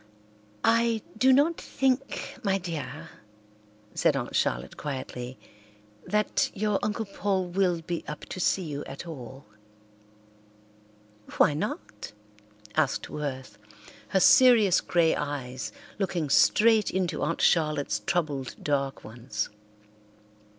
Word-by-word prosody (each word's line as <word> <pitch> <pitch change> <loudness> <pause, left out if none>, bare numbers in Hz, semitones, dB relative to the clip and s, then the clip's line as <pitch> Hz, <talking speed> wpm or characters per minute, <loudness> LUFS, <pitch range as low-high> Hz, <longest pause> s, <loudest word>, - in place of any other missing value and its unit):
"I 230 -1 +3
do 255 +4 +4
not 290 +5 +3
think, 270 0 -1
my 195 -2 +1
dear," 165 -3 -6 0.9
said - - +2
Aunt - - -4
Charlotte 60 +2 0
quietly, 130 -3 -6 0.7
"that 210 0 +1
your 210 0 0
Uncle 215 +1 -2
Paul 195 -1 -1
will 180 -2 +1
be 170 +1 -4
up 150 - -6
to - - -6
see 185 +1 +1
you 145 -3 -5
at 135 +5 -8
all." 135 -4 -9 1.9
"Why - - +5
not?" 110 -9 -5 0.6
asked 155 -4 0
Worth, 130 -5 -5 0.5
her 190 - +2
serious 225 -3 +6
grey 170 -2 +2
eyes 130 -3 -4 0.3
looking 175 -7 -1
straight 220 +4 +5
into 185 -2 -1
Aunt 165 +3 -1
Charlotte's 150 -9 +2
troubled 140 +2 -2
dark 140 -2 -1
ones. 110 -1 -4
165 Hz, 110 wpm, -27 LUFS, 140-200 Hz, 1.9 s, serious